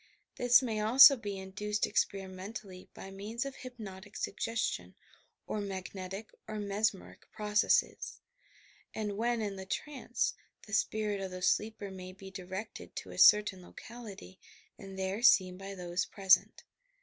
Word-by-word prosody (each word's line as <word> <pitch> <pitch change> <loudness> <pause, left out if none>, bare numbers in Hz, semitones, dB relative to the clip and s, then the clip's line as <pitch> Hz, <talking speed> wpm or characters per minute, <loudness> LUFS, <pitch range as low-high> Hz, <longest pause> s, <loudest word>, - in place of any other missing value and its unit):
This 245 +1 +6
may 225 -4 -1
also 255 +6 +9
be 205 -5 -5
induced 210 +2 -2
ex - - +3
periment 195 +3 -7
ally 185 -1 -11
by 195 - -9
means 215 +6 -4
of 275 -1 -6
hypnotic 210 -6 -9
suggestion 95 - -2 0.5
or 215 - -3
mag 190 -2 -5
netic 195 +3 -6 0.2
or 215 - -5
mesmeric 205 -1 -2
processes, 210 -1 +1 0.8
and, 210 -2 -2
when 235 +1 0
in 200 -2 -3
the 190 0 -8
trance, 285 +7 -2 0.3
the 215 - -11
spirit 210 -2 0
of 190 - -3
the 185 0 -7
sleeper 210 +1 0
may 185 -1 -8
be 190 0 -11
directed 190 +3 -7
to - - -6
a - - -7
certain 210 -3 +6
locality 205 -1 -11 0.4
and 195 -1 -10
there 190 +3 -2
seen 185 -6 +5
by 195 +1 -8
those 180 0 -2
present. 195 -2 +3
200 Hz, 150 wpm, -32 LUFS, 190-220 Hz, 0.8 s, also